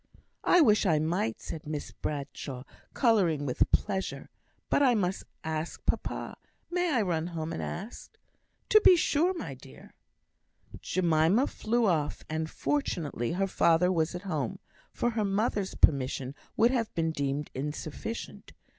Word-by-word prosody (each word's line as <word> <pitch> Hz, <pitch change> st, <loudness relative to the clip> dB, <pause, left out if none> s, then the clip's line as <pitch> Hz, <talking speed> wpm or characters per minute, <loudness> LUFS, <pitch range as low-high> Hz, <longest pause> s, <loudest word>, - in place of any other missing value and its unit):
"I 360 Hz, -, +5 dB
wish 215 Hz, -7 st, +4 dB
I 160 Hz, -3 st, +4 dB
might," 155 Hz, -7 st, -1 dB
said 155 Hz, -2 st, -7 dB
Miss 150 Hz, -1 st, -4 dB
Bradshaw, 140 Hz, -3 st, -5 dB, 0.3 s
colouring 185 Hz, -, +3 dB
with 125 Hz, -, +1 dB
pleasure. 190 Hz, -1 st, -1 dB, 0.4 s
"But -, -, +2 dB
I 255 Hz, -4 st, +5 dB
must 190 Hz, -2 st, -1 dB, 0.2 s
ask 160 Hz, +1 st, -4 dB
papa. -, -, -2 dB, 0.3 s
May 355 Hz, -1 st, +1 dB
I 240 Hz, -6 st, +2 dB
run 170 Hz, -3 st, -1 dB
home 165 Hz, -1 st, -4 dB
and -, -, -4 dB
ask?" 205 Hz, +7 st, -7 dB, 0.5 s
"To 430 Hz, -, +7 dB
be 370 Hz, -, +8 dB
sure, 330 Hz, +1 st, +2 dB
my -, -, -5 dB
dear!" -, -, -14 dB, 0.9 s
Jemima 175 Hz, -, +3 dB
flew 235 Hz, -2 st, 0 dB
off; 155 Hz, -7 st, 0 dB
and 160 Hz, 0 st, -2 dB
fortunately 160 Hz, -, -2 dB
her 195 Hz, +2 st, +1 dB
father 180 Hz, -1 st, +3 dB
was 165 Hz, -1 st, 0 dB
at 180 Hz, -, -6 dB
home; 155 Hz, -, -2 dB, 0.3 s
for 240 Hz, -, 0 dB
her 220 Hz, -2 st, 0 dB
mother's 200 Hz, 0 st, 0 dB
permission 135 Hz, -2 st, +2 dB, 0.2 s
would 235 Hz, +2 st, +5 dB
have 235 Hz, -4 st, 0 dB
been 165 Hz, -1 st, +1 dB
deemed 140 Hz, -1 st, -2 dB
insufficient. 150 Hz, -, -6 dB
175 Hz, 145 wpm, -29 LUFS, 155-220 Hz, 0.9 s, be